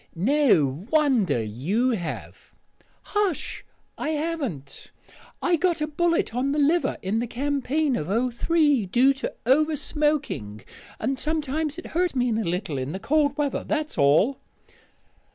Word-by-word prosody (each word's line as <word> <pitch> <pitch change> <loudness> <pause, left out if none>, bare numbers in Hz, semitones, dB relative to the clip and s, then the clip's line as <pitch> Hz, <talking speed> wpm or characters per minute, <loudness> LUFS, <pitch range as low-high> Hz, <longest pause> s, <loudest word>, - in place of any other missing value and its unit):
"No 185 - +2
wonder 260 - +2
you 170 - 0
have 175 -8 -6 0.2
" - - -35
"Hush! 415 -6 -1 0.4
I - - -2
haven't. 295 - -4 0.5
I 350 -1 +3
got 345 0 +1
a 300 - 0
bullet 335 -3 0
on 265 +3 0
the - - -1
liver 305 +4 +2
in 200 +4 0
the 240 - -2
campaign 280 +2 0
of 150 - -3 0.3
'03, 290 - +2
due 250 +8 +4
to 270 - -4
over 305 +5 +3
smoking; 295 - -1 0.4
and 270 -1 -1
sometimes 305 0 -2
it 355 - -8
hurts 350 -2 -1
me 250 -1 +1
a - - +1
little 170 -5 -2
in 130 +4 -4
the 190 - -4
cold 290 +4 +1
weather. 290 -2 -1
That's 310 0 -2
all." 155 - +3
275 Hz, 145 wpm, -25 LUFS, 195-310 Hz, 0.5 s, due